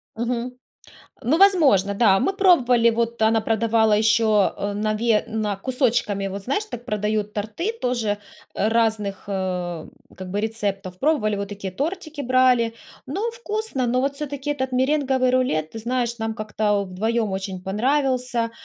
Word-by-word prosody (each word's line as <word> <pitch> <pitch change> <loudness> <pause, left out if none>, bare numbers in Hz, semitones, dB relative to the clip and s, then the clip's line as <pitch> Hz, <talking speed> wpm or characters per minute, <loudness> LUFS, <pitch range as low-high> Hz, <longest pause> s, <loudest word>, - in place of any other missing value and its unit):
Мгм. 240 +2 -2 0.7
Ну, 275 +7 +2
возможно, 290 - +4
да, 200 -3 +4
мы 390 - +1
пробовали, 255 - +4
вот 235 0 -2
она 220 +1 +4
продавала 220 0 +2
еще, 220 +1 +3 0.3
э, 205 0 -3
на 215 +1 -1
ве 220 0 +2
на 215 -2 -2
кусочками, 220 -4 0
вот, 195 +1 -6
знаешь, 280 - -1
так 245 - -8
продают 210 -1 -1
торты 220 - -3
тоже 235 -4 0 0.4
разных, 215 -2 0
э, 180 -4 -3 0.3
как 185 -1 -8
бы 200 +2 -1
рецептов, 200 -4 -3
пробовали, 230 -8 +1
вот 200 0 -4
такие 195 -2 -6
тортики 310 - -4
брали, 250 -3 +3 0.3
но 405 - -2
вкусно, 435 - -3
но 250 +2 +1
вот 275 +1 0
все-таки 285 0 -4
этот 265 -3 -2
меренговый 260 -1 +2
рулет, 205 -12 0
ты 225 - -6
знаешь, 240 0 -1
нам 225 0 -2
как-то 210 -2 -1
вдвоем 215 +4 -1
очень 190 -1 -4
понравился, 250 +2 0
230 Hz, 150 wpm, -23 LUFS, 205-260 Hz, 0.7 s, возможно